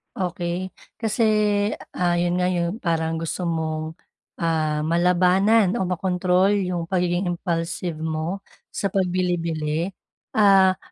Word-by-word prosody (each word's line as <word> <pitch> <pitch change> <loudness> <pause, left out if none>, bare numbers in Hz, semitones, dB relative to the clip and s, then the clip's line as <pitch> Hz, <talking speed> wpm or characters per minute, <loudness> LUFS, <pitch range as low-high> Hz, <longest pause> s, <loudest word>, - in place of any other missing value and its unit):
Okey. 180 0 -3 0.3
Kasi, 225 +1 0 0.7
ah 175 -1 +2
'yon 175 +1 +1
nga 180 - +2
yung 175 +4 -1
parang 165 -2 -1
gusto 165 +2 -3
mong, 160 -2 -2 0.5
ah, 155 -2 0
malabanan 180 +4 +3
o - - 0
makontrol, 180 +1 +1
yung 180 -3 -1
pagiging 180 0 0
impulsive 170 -1 -3
mo 160 +4 -3 0.3
sa 200 - -1
pagbili-bili. 175 -3 -1 0.4
Ah, 195 -3 +5
175 Hz, 110 wpm, -23 LUFS, 165-185 Hz, 0.7 s, Ah